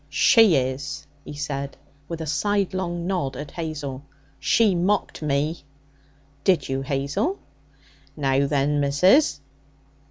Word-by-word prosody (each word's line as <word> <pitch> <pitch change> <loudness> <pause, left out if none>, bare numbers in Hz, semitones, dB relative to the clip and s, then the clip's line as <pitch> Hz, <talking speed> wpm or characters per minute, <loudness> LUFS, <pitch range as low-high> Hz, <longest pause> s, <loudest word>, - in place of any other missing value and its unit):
'She 210 - +5
is,' 140 +3 -2 0.2
he 145 - -9
said, 140 -1 -4 0.3
with 165 0 -5
a - - -3
sidelong 180 +2 -1
nod 175 -9 -2
at 145 0 -7
Hazel. 145 -5 -5 0.4
'She 220 -4 +3
mocked 185 +2 0
me.' 150 +2 -1 0.8
'Did 175 -8 +2
you, 135 0 -2
Hazel?' 140 - -1 0.8
'Now 135 -1 +2
then, 145 +1 +1
missus!' 145 - +3
150 Hz, 115 wpm, -24 LUFS, 140-180 Hz, 0.8 s, She